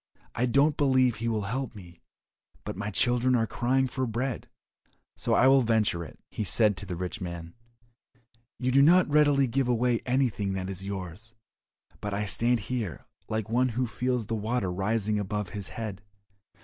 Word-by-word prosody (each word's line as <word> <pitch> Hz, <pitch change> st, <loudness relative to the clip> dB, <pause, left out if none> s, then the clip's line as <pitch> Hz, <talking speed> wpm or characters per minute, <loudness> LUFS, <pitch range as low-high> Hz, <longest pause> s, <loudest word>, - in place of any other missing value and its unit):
I 125 Hz, +2 st, 0 dB
don't 140 Hz, +4 st, +3 dB
believe 130 Hz, -4 st, +3 dB
he 115 Hz, +2 st, -3 dB
will 110 Hz, -2 st, 0 dB
help 125 Hz, +3 st, -3 dB
me, 85 Hz, -4 st, -13 dB, 0.6 s
but -, -, -5 dB
my 105 Hz, +2 st, -4 dB
children 120 Hz, +4 st, +2 dB
are 115 Hz, -2 st, +2 dB
crying 125 Hz, +5 st, +1 dB
for 130 Hz, 0 st, -2 dB
bread, 120 Hz, +2 st, -3 dB, 0.7 s
so -, -, 0 dB
I 130 Hz, -, +5 dB
will 135 Hz, 0 st, +6 dB
venture 110 Hz, -7 st, +1 dB
it." -, -, -11 dB
He -, -, -3 dB
said 105 Hz, +1 st, +3 dB
to 100 Hz, -, -7 dB
the 90 Hz, -, -4 dB
rich 90 Hz, +4 st, -5 dB
man, 85 Hz, -1 st, -6 dB, 1.0 s
"You 130 Hz, 0 st, 0 dB
do 135 Hz, +2 st, +5 dB
not 175 Hz, +5 st, +6 dB
readily 145 Hz, -2 st, +5 dB
give 130 Hz, +1 st, 0 dB
away 120 Hz, -1 st, +2 dB
anything 120 Hz, -7 st, +1 dB
that 95 Hz, 0 st, -3 dB
is 95 Hz, +1 st, -6 dB
yours, 100 Hz, +4 st, -7 dB, 0.6 s
but 105 Hz, -1 st, -3 dB
I 105 Hz, +1 st, -1 dB
stand 115 Hz, +3 st, +2 dB
here 110 Hz, -, -4 dB, 0.2 s
like 110 Hz, -2 st, -2 dB
one 125 Hz, +3 st, +2 dB
who 125 Hz, +2 st, -1 dB
feels 125 Hz, +1 st, -1 dB
the 115 Hz, -, -4 dB
water 110 Hz, -3 st, -1 dB
rising 105 Hz, +3 st, 0 dB
above 105 Hz, -1 st, -3 dB
his 100 Hz, -3 st, -6 dB
head. 105 Hz, -4 st, -6 dB
115 Hz, 175 wpm, -28 LUFS, 100-125 Hz, 1.0 s, will